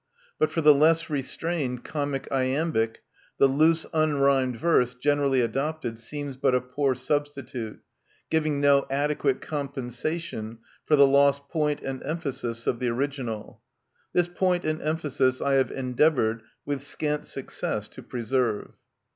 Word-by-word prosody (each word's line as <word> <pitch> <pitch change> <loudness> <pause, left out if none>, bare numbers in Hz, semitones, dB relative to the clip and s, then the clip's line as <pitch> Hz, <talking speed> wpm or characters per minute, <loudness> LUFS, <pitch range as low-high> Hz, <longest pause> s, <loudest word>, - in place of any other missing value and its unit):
But 155 - +3
for 165 - -1
the 150 -1 +8
less 160 +3 +3
restrained 140 -2 -2
comic 145 -2 -3
iambic, 130 -3 0 0.3
the - - +6
loose 155 +4 +3
unrhymed 140 -5 +2
verse 125 -7 +2
generally 140 0 +2
adopted 135 -1 -2
seems 145 +3 -6
but 130 -1 +2
a - - +4
poor 130 +2 -1
substitute, 130 -4 -3 0.5
giving 155 -2 +1
no 140 -1 +4
adequate 140 -1 0
compensation 135 -3 -4 0.3
for 155 - +5
the 140 -1 +7
lost 140 0 +3
point 150 -3 0
and 135 -1 -4
emphasis 135 -7 -4
of 120 - 0
the 125 - 0
original 125 -4 -3 0.5
This 175 -1 +2
point 180 0 0
and 155 +1 -1
emphasis 145 -4 0
I 140 - +1
have 135 -1 +3
endeavoured, 125 -3 +1 0.2
with 145 -2 -2
scant 150 +1 -2
success, - - -4
to - - -11
preserve. 120 -2 -1
140 Hz, 135 wpm, -26 LUFS, 125-150 Hz, 0.5 s, the